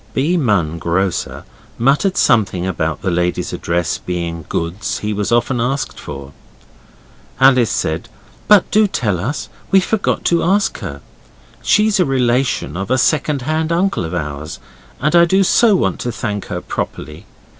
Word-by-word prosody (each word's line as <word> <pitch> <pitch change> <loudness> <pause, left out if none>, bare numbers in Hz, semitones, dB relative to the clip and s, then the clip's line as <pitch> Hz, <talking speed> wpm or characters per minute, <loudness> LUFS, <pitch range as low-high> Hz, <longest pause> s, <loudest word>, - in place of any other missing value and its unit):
B. 150 +7 +1
Munn, 100 - +1
grocer, 90 +2 -1 0.3
muttered 145 - +2
something 95 -5 +2
about 80 -4 -2
the 95 - 0
lady's 90 0 -1
address 85 0 -1
being 85 -2 -4
goods 85 +6 -2
he 105 0 -3
was 105 +2 -2
often 120 +1 +1
asked 135 +4 -2
for. 70 -1 -8 1.1
Alice 130 -3 +5
said, 90 -7 -2 0.4
'But 210 -3 +5
do 215 0 +4
tell 105 - -1
us. 130 +11 -3 0.2
We 195 - +5
forgot 205 +2 -1
to 170 -1 +2
ask 195 +3 +1
her. 70 0 -7 0.6
She's 210 -1 +3
a 180 - +4
relation 125 -4 0
of 100 +3 -4
a 130 - +2
second 145 +1 +1
hand 155 +3 -1
uncle 175 - +1
of 80 +1 -4
ours, 75 -1 -5 0.4
and 150 +4 +1
I 170 0 +7
do 190 +3 +3
so 215 +3 +4
want 95 - 0
to 120 - -3
thank 105 -2 -4
her 90 0 -4
properly. 80 +3 -6
115 Hz, 155 wpm, -17 LUFS, -, 1.1 s, I